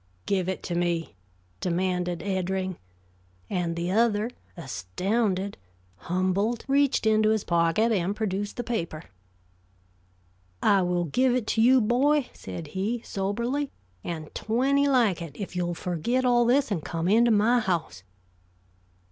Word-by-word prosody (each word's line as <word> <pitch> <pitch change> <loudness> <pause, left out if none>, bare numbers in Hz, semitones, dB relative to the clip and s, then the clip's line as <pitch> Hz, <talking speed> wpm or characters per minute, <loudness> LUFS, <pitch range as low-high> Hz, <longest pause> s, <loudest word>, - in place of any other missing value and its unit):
"Give 190 -2 0
it 190 - -4
to 175 - -4
me," 170 -4 -1 0.5
demanded 180 -1 -1
Eddring; 190 -1 -2 0.7
and 170 -2 -1
the 170 +1 -2
other, 220 +1 +2 0.3
astounded, 185 - -2 0.4
humbled, 185 - -1
reached 275 -3 +2
into 215 0 +4
his 220 -2 +1
pocket 170 +7 +2
and 195 -1 0
produced 205 -1 -3
the 245 - -2
paper. 170 -10 -3 1.6
"I 200 -2 +4
will 175 -1 0
give 250 - +2
it 250 -4 -1
to 225 - +2
you, 255 +3 +6
boy," 260 +5 +2
said 160 -3 -8
he, 210 +7 -2
soberly, 235 +9 -2 0.3
"and 160 -3 -6
twenty 275 +6 +1
like 235 -10 +3
it, 155 -4 -8
if 195 -3 -6
you'll 175 -1 -1
forget 185 +11 -1
all 240 -1 +4
this 260 +1 +2
and 170 -7 -1
come 165 0 -3
into 230 +5 +4
my 225 +3 +4
house." 170 - -2
200 Hz, 135 wpm, -26 LUFS, 175-235 Hz, 1.6 s, you